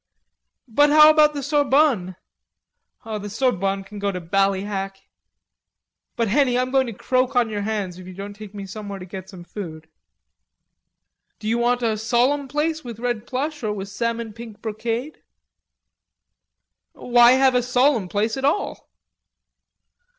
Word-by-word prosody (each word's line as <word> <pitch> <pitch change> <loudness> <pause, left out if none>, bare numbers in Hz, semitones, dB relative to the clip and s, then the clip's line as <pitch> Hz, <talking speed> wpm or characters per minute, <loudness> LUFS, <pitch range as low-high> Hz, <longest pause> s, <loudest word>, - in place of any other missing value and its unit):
"But 290 +6 +4
what 305 +1 +8
about 305 -1 +5
the 285 - -3
Sorbonne?" 280 -9 +2 0.9
"The 210 -2 -5
Sorbonne 195 -4 0
can 205 +1 -10
go 200 0 0
to 180 - -4
Ballyhack." 195 +2 -1 1.2
"But, 230 -1 0
Henny, 250 +2 +2
I'm 255 0 0
going 265 -1 +2
to 230 - -5
croak 255 +5 0
on 240 -3 +2
your 205 -1 -2
hands 200 -4 -3
if 185 - -11
you 185 - -10
don't 200 +1 -7
take 210 0 -11
me 200 -1 -6
somewhere 200 0 -7
to 180 - -9
get 190 +1 -9
some 185 -4 -11
food." 160 -4 -8 1.5
"Do 215 - -7
you 230 +2 +1
want 245 +1 +1
a 220 -2 0
solemn 250 +6 +1
place 310 +3 -1
with 235 -3 -7
red 240 -2 -3
plush 290 +3 -3
or 215 -3 -1
with 195 -1 -6
salmon 230 +1 -3
pink 225 -1 -10
brocade?" 230 +6 -4 1.7
"Why 240 0 +5
have 265 0 +4
a 250 - +3
solemn 250 -3 +2
place 215 +5 -1
at 265 - -5
all?" 300 +9 -1
230 Hz, 150 wpm, -22 LUFS, 200-260 Hz, 1.7 s, what